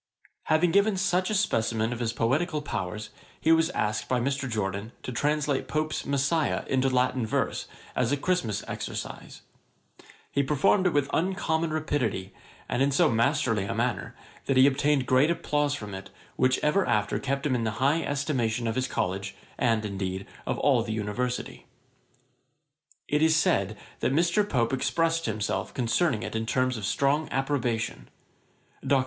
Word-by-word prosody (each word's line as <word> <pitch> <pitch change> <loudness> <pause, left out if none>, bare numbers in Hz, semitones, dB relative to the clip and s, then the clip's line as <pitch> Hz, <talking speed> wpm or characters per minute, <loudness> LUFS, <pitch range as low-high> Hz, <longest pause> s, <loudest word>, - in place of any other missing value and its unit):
Having 160 +2 +3
given 200 +2 +3
such 185 -1 +1
a 215 - 0
specimen 115 - +1
of 120 - -6
his 115 -2 0
poetical 145 +7 0
powers, 105 -4 -4 0.3
he 160 - +3
was 165 0 +4
asked 105 0 -2
by 125 - +2
Mr. 135 +1 -1
Jorden, 105 0 -3
to - - -4
translate 145 +2 0
Pope's 155 0 -2
Messiah 140 +3 +1
into 135 0 +1
Latin 130 -1 +1
verse, 110 - -1 0.3
as 125 0 +1
a 145 - +2
Christmas 120 - -1
exercise. - - -6 0.9
He 140 - +2
performed 150 +7 +3
it 180 - 0
with 145 -2 +2
uncommon 165 -2 0
rapidity, 145 -11 -2 0.3
and 120 - -1
in 140 - +4
so 150 +3 +3
masterly 115 -3 +1
a - - -3
manner, - - -2 0.3
that 135 - +2
he 130 - +8
obtained 140 0 +2
great 130 +5 +4
applause 150 -3 0
from 105 -7 -7
it, 95 0 -7 0.3
which 130 0 +3
ever 150 +6 +3
after 105 -2 +1
kept 140 +1 -2
him 140 - +1
high 115 +6 +1
in - - -1
the - - -4
estimation 130 -5 -1
of 115 - 0
his 130 +2 -1
College, 95 +2 -2 0.2
and, 115 -3 +2
indeed, 95 -1 -3 0.2
of - - 0
all 130 -5 +3
the 110 -1 -3
University. 110 +4 -3 1.4
It 150 +1 +1
is 160 0 +5
said, 105 -9 +1 0.2
that - - +1
Mr. 175 +7 +2
Pope 120 - +1
expressed 165 +4 +1
himself 105 -1 -2
concerning 125 0 +1
it - - -5
in 110 0 -2
terms 130 +1 +1
of 105 -3 -4
strong 140 +8 +1
approbation. 125 -4 -1 0.7
Dr. 140 - +3
130 Hz, 165 wpm, -27 LUFS, 115-150 Hz, 1.4 s, he